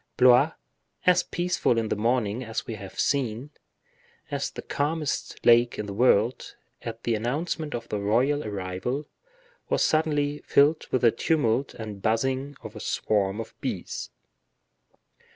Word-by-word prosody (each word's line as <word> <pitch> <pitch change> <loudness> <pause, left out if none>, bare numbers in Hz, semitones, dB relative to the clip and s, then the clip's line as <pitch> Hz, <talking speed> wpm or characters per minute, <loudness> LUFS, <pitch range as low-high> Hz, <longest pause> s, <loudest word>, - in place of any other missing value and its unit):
Blois, 130 +5 +6 0.5
as 180 -1 +5
peaceful 175 -8 0
in 110 -1 0
the - - +1
morning, 115 +1 0
as 115 -1 -4
we 115 - -5
have 100 -3 -9
seen, 130 0 0 0.8
as - - -1
the - - -8
calmest 150 +1 -2
lake 120 0 +5
in 105 - -3
the 100 - -6
world, 115 +1 +2 0.3
at 115 0 -7
the 120 - +1
announcement 145 +7 -2
of 115 -1 -6
the 105 - -2
royal 125 +9 +2
arrival, 100 +8 -3 0.6
was - - +2
suddenly 150 -2 +1
filled 150 +3 +3
with 130 - 0
the 115 - +7
tumult 130 -1 0
and 105 -3 -7
buzzing 130 +6 0
of - - -9
a - - -7
swarm 100 -1 0
of 115 - -6
bees. - - -4
120 Hz, 145 wpm, -26 LUFS, 110-145 Hz, 0.8 s, the